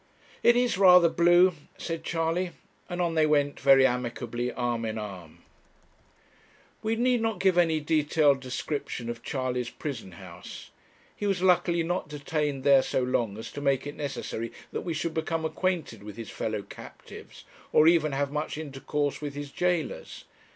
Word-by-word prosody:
'It 240 - +5
is 245 -5 +1
rather 180 -3 +8
blue,' 175 +2 +5 0.2
said 165 -1 -5
Charley; 170 +2 -1 0.4
and 175 0 -4
on 170 -2 +1
they 155 -1 +3
went 145 -1 +1
very 135 -1 +6
amicably 120 -1 -2
arm 120 -2 -2
in 110 0 -3
arm. 95 -7 -8 1.4
We 220 +1 0
need 245 0 +2
not 225 -1 -1
give 190 -2 +3
any 165 -3 +3
detailed 150 -2 +2
description 130 -2 -4
of 115 -1 -9
Charley's 125 -3 -2
prison 130 - -6
house. 90 0 -11 0.4
He 205 - -3
was 190 -2 0
luckily 175 -2 +3
not 175 -1 -2
detained 150 -2 -2
there 140 -1 +6
so 130 - -1
long 120 -5 -1
as 110 - -7
to 145 - -7
make 135 -1 +1
it 145 - -5
necessary 125 -5 -4 0.2
that - - -3
we 170 -2 -3
should 160 +1 -2
become 160 0 -2
acquainted 165 - -2
with 105 0 -10
his 115 - -7
fellow 110 -2 -3
captives, 100 - -12 0.3
or 155 - +5
even 165 -3 +4
have 140 0 -1
much 150 +1 -3
intercourse 145 -1 -3
with 145 -1 -5
his 145 -1 -6
jailers. 175 -4 -2
150 Hz, 165 wpm, -27 LUFS, 125-170 Hz, 1.4 s, rather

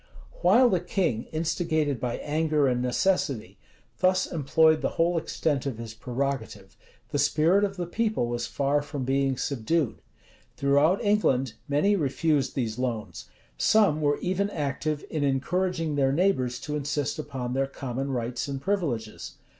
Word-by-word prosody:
While 230 +8 +6
the 185 - +2
king, 170 - -1
instigated 160 -3 0
by 120 -1 -2
anger 150 -1 +1
and 125 -1 +1
necessity, 125 - 0 0.4
thus 185 0 +3
employed 155 +1 +3
the - - -2
whole 170 +1 +2
extent 155 -4 -1
of 130 -5 -3
his 115 -1 -7
prerogative, 120 -4 -4 0.3
the - - -1
spirit 175 +7 +3
of 195 -1 -1
the 175 - -2
people 215 - 0
was 120 0 -3
far 145 +1 +1
from 145 -2 -5
being 135 0 +1
subdued. 140 +2 -1 0.6
Throughout 145 +9 +3
England, 135 - +2 0.2
many 175 +9 +3
refused 145 -3 0
these 115 -3 -2
loans; 120 -4 -3 0.3
some 195 - +4
were 145 -1 +2
even 190 +3 0
active 150 -2 -2
in 155 -2 -1
encouraging 165 +4 0
their 135 -2 +2
neighbors 135 -7 +1
to 150 - -4
insist 145 0 -2
upon 125 -4 -4
their 135 +1 +1
common 135 0 -4
rights 120 -1 -2
and 140 -1 -4
privileges. 140 - -2
145 Hz, 145 wpm, -27 LUFS, 130-170 Hz, 0.6 s, While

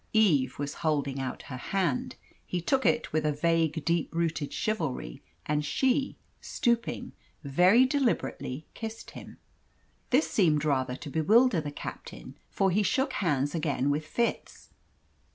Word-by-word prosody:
Eve 155 - +3
was 145 0 -3
holding 145 -4 0
out 130 -1 -4
her 130 - -7
hand. 170 -1 -1 0.3
He 180 - -3
took 265 +10 +1
it 235 - +1
with 155 0 +1
a 150 - +2
vague, 160 0 0
deep 170 -1 0
rooted 165 -3 -1
chivalry, 155 - -3 0.2
and 150 0 0
she, 265 - 0 0.2
stooping, 235 -4 -1 0.3
very 180 - +5
deliberately 240 - -1
kissed 225 0 -7
him. - - -11 0.7
This 265 +5 +3
seemed 155 -7 +2
rather 130 -4 0
to 145 +2 -8
bewilder 210 - +4
the 150 - -5
captain, 145 - -8
for 195 -1 +1
he 205 +4 +2
shook 265 +6 +1
hands 145 -6 0
again 145 -4 0
with 155 +2 -2
Fitz. 235 +7 -3
160 Hz, 140 wpm, -28 LUFS, 145-220 Hz, 0.7 s, very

